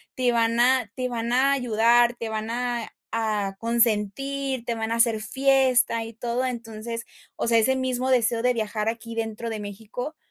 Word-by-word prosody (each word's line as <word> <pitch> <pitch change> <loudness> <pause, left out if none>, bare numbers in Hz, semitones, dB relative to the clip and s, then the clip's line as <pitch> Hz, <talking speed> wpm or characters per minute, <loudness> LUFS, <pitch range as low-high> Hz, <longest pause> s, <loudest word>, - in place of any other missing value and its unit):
te 250 -1 +2
van 230 0 +2
a 250 -3 +3
te 255 -1 -2
van 235 0 -3
a 270 +2 +4
ayudar, 240 -1 +3
te 230 -1 -5
van 220 0 -3
a 240 -1 -2 0.3
a 210 -3 -1
consentir, 235 +4 0
te 235 - -1
van 225 0 -3
a - - +1
hacer 230 -2 +2
fiesta, 260 -2 +2
y 225 - -9
todo. 240 +2 -2
Entonces, 230 -1 -5 0.3
o - - -1
sea, 230 -1 +5
ese 265 +4 +3
mismo 260 0 -1
deseo 235 -2 +2
de 250 - +3
viajar 215 0 -1
aquí 230 0 -6
dentro 225 +1 -3
de 220 - -4
México, 220 +8 -6
235 Hz, 180 wpm, -25 LUFS, 225-250 Hz, 0.3 s, sea